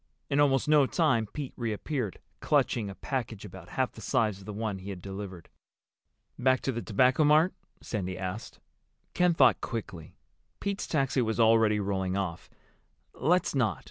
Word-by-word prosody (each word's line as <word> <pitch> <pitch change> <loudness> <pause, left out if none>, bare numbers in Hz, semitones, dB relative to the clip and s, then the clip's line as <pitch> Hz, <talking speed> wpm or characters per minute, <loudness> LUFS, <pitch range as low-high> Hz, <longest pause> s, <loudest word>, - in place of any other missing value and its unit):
In 140 - +2
almost 135 -2 +3
no 150 -3 +5
time 130 -11 +2
Pete 145 -4 -5
reappeared, 115 - -3 0.2
clutching 110 -4 +1
a 100 - -8
package 115 -6 -4
about 100 - -11
half - - -1
the - - -12
size 105 -4 0
of 95 - -13
the 105 - -6
one 105 -2 -3
he 95 +2 -8
had 95 -2 -6
delivered. 95 -2 -7 0.9
"Back 130 0 +3
to 135 - -1
the 120 -1 -4
Tobacco 125 +8 +3
Mart?" 155 +4 +5 0.3
Sandy 95 -4 -4
asked. 95 +3 -6 0.5
Ken 180 -1 +3
thought 130 -5 +5
quickly. 95 -9 -6 0.4
Pete's 200 -1 -3
taxi 135 -4 +1
was 110 -1 -1
already 110 -2 +5
rolling 95 -1 -1
off. 90 -3 -4 0.6
"Let's 180 +4 +1
not. 120 -7 +1
115 Hz, 160 wpm, -29 LUFS, 100-135 Hz, 0.9 s, no